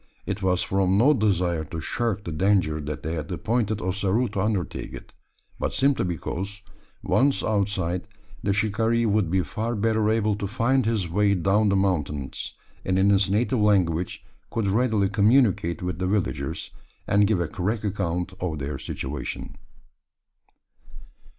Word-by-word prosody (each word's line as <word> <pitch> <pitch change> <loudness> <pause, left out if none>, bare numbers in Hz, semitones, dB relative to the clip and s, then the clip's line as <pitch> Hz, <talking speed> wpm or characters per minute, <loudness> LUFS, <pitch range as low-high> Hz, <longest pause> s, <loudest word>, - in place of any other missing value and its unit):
It 100 +1 -3
was 90 -1 +2
from 95 0 +1
no 135 +8 +5
desire 90 - +1
to 80 +2 -6
shirk 105 +4 -2
the 85 - -5
danger 80 -2 +1
that 75 -1 -5
they 80 +2 -2
had 80 +1 -4
appointed 110 +3 0
Ossaroo 100 +5 +1
to 100 -1 -2
undertake 100 -5 -2
it; - - -12 0.5
but - - -1
simply 135 -5 +2
because, 95 +4 -4 0.4
once 140 +1 +2
outside, 95 -4 -1 0.3
the 100 - 0
shikaree 110 +3 +1
would 105 -4 +2
be 95 +1 +2
far 110 +10 -3
better 110 0 +1
able 110 -1 +2
to 100 - -3
find 115 +4 +1
his 110 -6 0
way 100 +4 +2
down 100 +4 +2
the 100 - +2
mountains: 75 -8 -1 0.3
and 95 0 0
in 100 +1 +4
his 100 -1 +3
native 120 +5 +1
language 90 -5 +1 0.2
could 115 -3 -1
readily 105 0 +2
communicate 100 -4 +2
with 90 -2 -3
the 90 - 0
villagers, 100 0 -2 0.3
and 100 0 +3
give 105 -4 +1
a 85 - 0
correct 105 +4 -2
account 95 -2 -2
of 85 -4 -2
their 70 +1 -4
situation. 65 0 -5
100 Hz, 155 wpm, -25 LUFS, 90-110 Hz, 0.5 s, no